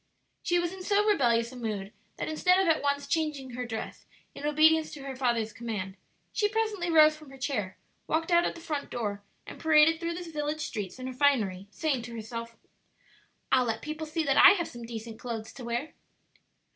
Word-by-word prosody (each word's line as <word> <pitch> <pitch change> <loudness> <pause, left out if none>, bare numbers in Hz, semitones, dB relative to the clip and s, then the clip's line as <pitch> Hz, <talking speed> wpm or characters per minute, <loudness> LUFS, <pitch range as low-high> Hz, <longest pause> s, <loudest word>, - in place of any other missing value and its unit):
She 350 - +1
was 345 0 -1
in 380 - -9
so 405 +3 +2
rebellious 235 - +2
a - - -11
mood 215 -4 -4 0.2
that - - -3
instead 360 +4 +3
of 385 - +2
at 320 -1 +3
once 285 0 0
changing 285 -3 -2
her 250 0 -5
dress 225 -1 -6 0.3
in 290 - -4
obedience 315 +1 +4
to 285 - -8
her 270 -1 -5
father's 235 -4 0
command, 210 -5 -5 0.4
she 415 -1 +2
presently 425 -5 -1
rose 310 -2 +6
from 305 -2 -14
her 270 - -12
chair, 220 -8 -3 0.3
walked 325 +2 0
out 345 0 +5
at - - -1
the 335 - -10
front 300 -3 -4
door 205 -4 -3 0.2
and - - -10
paraded 320 0 +5
through 335 0 -3
the 355 - -5
village 305 -1 -3
streets 210 -9 -4
in 255 - -7
her 260 - -4
finery, 225 -9 +1
saying 275 +2 -1
to 235 0 -8
herself, 230 +1 -6 0.9
"I'll 255 -1 +4
let 225 -2 -2
people 310 +1 -5
see 315 +1 -1
that 275 -2 +4
I - - +11
have 345 -4 -2
some 235 -1 -9
decent 225 -1 -7
clothes 225 -3 -5
to 260 - -10
wear." 235 +6 -3
280 Hz, 205 wpm, -29 LUFS, 230-320 Hz, 0.9 s, I